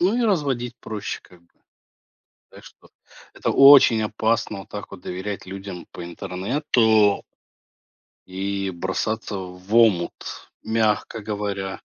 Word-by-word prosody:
ну 190 +7 +2
и 245 - +1
разводить 135 - 0
проще 110 -2 -5
как 90 -1 -20
бы. - - -31 1.0
Так - - -15
что - - -17 0.5
это - - -1
очень 135 -5 +7
опасно, 110 -1 -1
вот - - -13
так 105 -1 -8
вот 100 - -10
доверять 95 +2 -5
людям 95 -1 -8
по 90 - -8
интернету 105 - +1 1.0
и 95 +1 -3
бросаться 95 +4 -3
в 90 +3 -7
омут, 105 -7 +1
мягко 110 0 0
говоря. 100 -2 -3
105 Hz, 120 wpm, -23 LUFS, 95-115 Hz, 1.0 s, очень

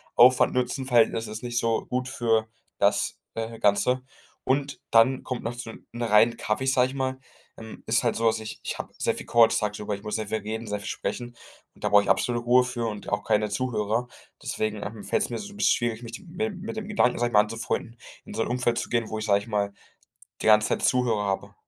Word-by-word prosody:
Aufwand-Nutzen-Verhältnis 125 -2 +4
ist 110 +1 -6
nicht 120 -1 -3
so 115 -1 +1
gut 125 0 -2
für 115 -2 +1 0.3
das, - - +1 0.2
äh, 115 0 -4
Ganze. 125 +5 +2 0.4
Und 140 +1 0
dann 125 +3 +4
kommt 125 -2 -4
noch 115 +2 -3
dazu, 120 -1 -7 0.2
in 120 - -7
reinen 115 +1 +5
Cafés, 130 +5 0
sage 125 -1 +4
ich 130 - -8
mal 130 -1 -1 0.4
ähm, 110 0 -10
ist 115 +2 +2
halt 120 - +1
so, 115 0 +1
dass 110 0 +2
ich 110 0 -7
ich - - -4
habe - - -7
sehr - - +1
viel - - -8
Calls 115 -1 +5
tagsüber, 105 -1 -2
ich 100 - -12
muss 105 0 -3
sehr 110 -2 -3
viel 110 - -1
reden, 110 +2 -5
sehr 105 0 -2
viel 100 - -8
sprechen. 120 -1 -4 0.4
Und - - -19
da - - +1
brauche 105 0 +6
ich - - -4
absolute 120 -1 +1
Ruhe 125 +1 +5
für 120 -2 -3
und 105 -2 -5
auch 105 0 -1
keine 105 0 +1
Zuhörer. 115 0 -1 0.4
Deswegen, 110 -1 -2
ähm, 105 0 -7
fällt - - +1
es - - -3
mir 115 - -3
so 205 - -8
'n 205 - -13
bisschen 210 - +4
schwierig, 120 -1 -2
mich 115 - -7
d 195 - -8
mit 170 +4 -11
dem 220 -4 -2
mit 220 +2 -6
dem 210 -1 -4
Gedanken, 195 -12 +2
sage 120 0 +1
ich - - -13
mal 105 - +7
anzufreunden, 115 +2 -2 0.3
in - - -9
so 115 - +1
'n - - -4
Umfeld 120 -1 0
zu - - -3
gehen, 115 -2 0
wo 110 - -3
ich 110 - -3
sage 100 -2 +4
ich 100 - -11
mal, 100 -2 -1 0.7
die - - 0
ganze 110 0 +6
Zeit - - 0
Zuhörer 120 -5 +2
habe. 95 -1 -2
115 Hz, 240 wpm, -26 LUFS, 110-125 Hz, 0.7 s, mal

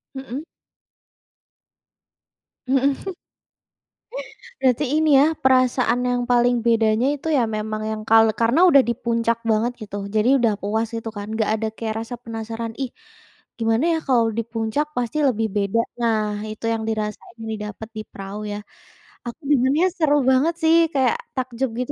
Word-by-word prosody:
Mhm. 265 +2 -6 2.2
Mhm. 270 +1 +2 1.7
Berarti 260 +3 +3 0.2
ini 295 -3 +5
ya, 310 +3 +4
perasaan 255 -1 +3
yang 245 0 0
paling 240 -1 +3
bedanya 225 +1 +3
itu 290 +2 -9
ya - - +3
memang 215 0 -3
yang 215 0 -4
kalau 225 0 +6
karena 235 +10 +2
udah 280 -5 +7
di 235 - +1
puncak 230 0 0
banget 220 +3 +1
gitu, 205 -1 -7 0.2
jadi 215 +3 +3
udah 230 -3 +2
puas 220 +3 -1
itu 225 0 -5
kan. 205 -2 -7
Nggak 220 -1 0
ada 220 - -2
kayak 220 -1 -4
rasa 245 - -6
penasaran, 225 0 -5
"ih, 265 -3 -3 0.7
gimana 225 +5 +1
ya - - -1
kalau 240 -3 +4
di 230 - +2
puncak, 225 +6 -1
pasti 245 +5 -1
lebih 225 -3 0
beda" 200 +3 +1 0.2
nah, 225 -2 +2 0.3
itu 215 +1 -9
yang 225 -1 -2
dirasain, 215 +1 -4 0.2
didapat 210 +1 -6
di 215 - -3
Prau 195 +1 -7
ya. 205 - -4 0.7
Aku 240 +7 -7
dengarnya 280 +4 +3
seru 305 -3 +3 0.2
banget 280 +6 +3
sih, 320 +1 +5 0.2
kayak 275 - +2 0.2
takjub 260 0 -2
gitu 250 +3 -2
235 Hz, 150 wpm, -22 LUFS, 220-260 Hz, 2.2 s, udah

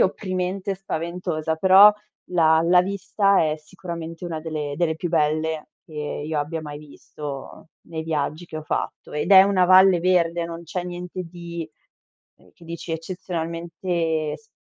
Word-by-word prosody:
opprimente 185 +1 -1
e - - -3
spaventosa. 170 -3 -3
Però 190 +4 +8 0.4
la 160 -2 +4
la 180 +1 +5
vista 195 0 +2
è 155 0 0
sicuramente 165 0 -8
una 165 -2 -4
delle 155 -3 -4
delle 160 -1 0
più 175 - -3
belle 155 0 0 0.2
che 155 - -18 0.3
io 155 -1 -1
abbia 155 +2 -3
mai 145 -1 -7
visto 145 0 -9
nei 160 -1 -6
viaggi 155 +1 -2
che 155 - -8
ho 155 - -5
fatto, - - -4
ed 150 +6 -2
è 190 0 +11
una 195 -2 +3
valle 185 0 +7
verde, 170 -1 +2
non 170 0 -7
c'è 175 +2 -4
niente 180 +1 -6
di, 170 -1 -7 0.7
uhm, - - -23
che 170 - -18
dici 170 0 -6
eccezionalmente 165 -2 -3
s 225 - -25
170 Hz, 155 wpm, -23 LUFS, 160-180 Hz, 0.7 s, è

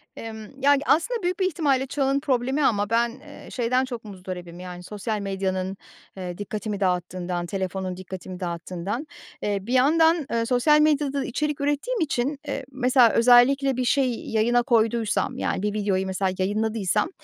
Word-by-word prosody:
Emm, 225 +4 -9
ya, 285 +1 +6
g 275 - -2
aslında 420 +10 +2
büyük 355 +2 -1
bir 375 - +2
ihtimalle 285 -6 +1
çağın 275 0 +1
problemi 270 +1 0
ama 205 -2 +1
ben, 235 +1 +2
eee, 290 +1 -13
şeyden 250 +1 +1
çok 240 -3 -7
muzdaribim, 180 -3 -8
yani, 180 -1 -8
sosyal 210 +3 -4
medyanın, 190 -1 -2 0.4
eee, 180 -2 -5
dikkatimi 210 0 -4
dağıttığından, 180 -1 -1
telefonun 190 0 -3
dikkatimi 185 -1 -8
dağıttığından. 180 - -4 0.3
Eee, 205 -1 0
bir 230 +6 -4
yandan, 320 +4 +4
ııı, 230 0 +1
sosyal 255 +5 +4
medyada 285 -3 +2
içerik 295 +3 -2
ürettiğim 290 - -1
için, 280 -3 -1
eee, 275 -1 -3
mesela 255 -2 +4
özellikle 250 +3 +5
bir 255 - 0
şey 260 -1 +2 0.2
yayına 240 +2 +2
koyduysam, 230 -2 +1
yani, - - -1
bir 210 -1 0
videoyu 200 -3 0
mesela 190 0 -1
yayınladıysam, 210 - 0
230 Hz, 155 wpm, -24 LUFS, 190-275 Hz, 0.4 s, ya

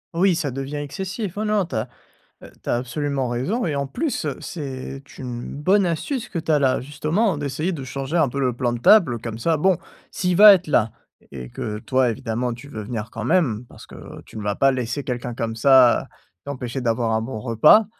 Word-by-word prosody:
Oui, 185 +1 +3
ça 145 -4 -2
devient 135 +3 -5
excessif. 190 - -5
Oh 215 - -1
non 210 -2 +1
tu 170 - -7
as 110 +3 -1 0.5
tu - - -11
as - - +3
absolument 135 +1 -2
raison 170 - -1
et 155 -4 -1
en 140 -1 -2
plus, 270 - -2
heu, 140 -3 -3
c'est 135 -4 -6 0.2
une 120 -2 -6
bonne 190 +7 +3
astuce 195 - -2
que 175 - -5
tu 160 0 -2
as 150 - +4
là 130 -3 +2
justement 155 - 0
d'essayer 145 +5 -2
de 150 -7 -5
changer 135 +5 -3
un 155 - +4
peu 140 +3 -4
le 125 -2 +1
plan 120 -1 0
de 120 - -4
table. 175 - +6
Heu, - - -4
comme 115 0 -6
ça, 160 +7 +2
bon! 185 +3 +3 0.3
S'il 180 -1 0
va 210 +2 +10
être 185 -3 0
là 115 -6 +2 0.4
et 65 -3 -8
que 105 - -5
toi, 130 0 +1
évidemment, 115 +2 -2
tu 120 +4 -11
veux 110 -7 -7
venir 110 0 -5
quand 110 - -6
même 130 - +1
parce - - -13
que - - -13 0.3
tu - - -12
ne - - -4
vas 100 0 -1
pas 135 - +4
laisser 125 +1 -3
quelqu'un 125 -2 -4
comme 115 -1 -3
ça 130 0 +5 0.4
t'empêcher 130 -2 -5
d'avoir 115 -1 0
un 110 - +1
bon 115 0 -5
repas, 125 - +5
135 Hz, 220 wpm, -22 LUFS, 120-165 Hz, 0.5 s, va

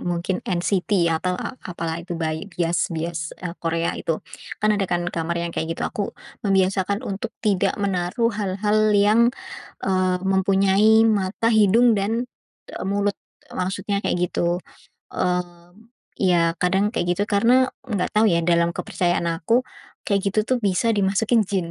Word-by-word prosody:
mungkin 175 +1 -2
NCT 180 0 +1
atau 165 +3 0
a 255 - -6
apa, 175 -2 -7
lah, 160 - -2
itu, 175 - -6
bai 160 +2 -2
bias 175 -1 -1
bias, 165 0 -4
eee, 175 -2 -5
Korea 165 0 -1
itu. 165 -1 -2 0.4
Kan, 215 0 +2
ada, 200 - 0
kan, 175 -1 -1
kamar 170 0 -2
yang 170 0 -3
kayak 160 +1 -2
gitu. - - -6
Aku 205 - -4 0.3
membiasakan 195 +1 +1
untuk 195 0 -4
tidak 200 -3 +1
menaruh 195 +4 0
hal-hal 210 +2 +1
yang, 215 +4 +4 0.5
eee, 185 -1 +1
mempunyai 195 +3 +4
mata, 210 +1 0
hidung, 220 +2 +4
dan, 225 +5 -1 0.4
eee, - - -6
mulut, 200 +1 0 0.4
maksudnya 195 +2 -2
kayak - - +1 0.2
gitu. 175 +1 0 0.5
Mmm, 175 0 -3 0.4
ya, 170 -3 +3
kadang 190 +3 +2
kayak 175 - -1
gitu 205 - +1
karena 240 +5 +4 0.2
nggak 205 -8 -2
tau, 215 - +5
ya, 170 -3 +2
dalam 170 0 +2
kepercayaan 175 -1 -1
aku, 170 +9 +1 0.5
kayak 200 - +2
gitu, 215 - -1
tuh, 255 +1 +1
bisa 205 +3 +1
dimasukin 210 +3 +2
jin, 190 -3 -1
190 Hz, 150 wpm, -22 LUFS, 175-205 Hz, 0.5 s, tau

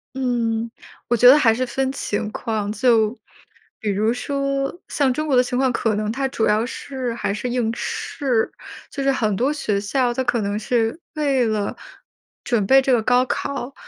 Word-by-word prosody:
嗯， 235 -3 -1 0.4
我 240 - +3
觉 245 - +6
得 275 +4 +9
还 230 -7 +4
是 255 +2 -1
分 265 +2 -1
情 215 -5 -3
况。 210 -2 -3
就 225 -1 +2 0.6
比 210 - -2
如 215 +3 +1
说 275 +4 -2
像 275 -3 +1
中 305 +4 -3
国 275 - +2
的 250 - +5
情 245 0 -3
况， 260 -1 +2
可 225 -2 0
能 210 0 -1
它 270 +3 -1
主 230 -4 -1
要 215 +2 +2
是 260 -1 -5
还 200 -3 -2
是 245 +4 -3
应 240 -2 0
试。 250 -4 -1 0.4
就 275 - -4
是 275 - +3
很 215 -6 0
多 255 +8 +1
学 210 -9 -1
校， 245 +4 0
它 260 +2 -1
可 245 -2 0
能 205 0 -2
是 225 +5 0 0.2
为 275 -5 +1
了 215 -2 -1 0.7
准 220 -5 +1
备 270 +5 +6
这 265 - 0
个 240 -3 +4
高 250 +2 +3
考， 275 0 -3
245 Hz, 205 characters per minute, -21 LUFS, 220-265 Hz, 0.7 s, 得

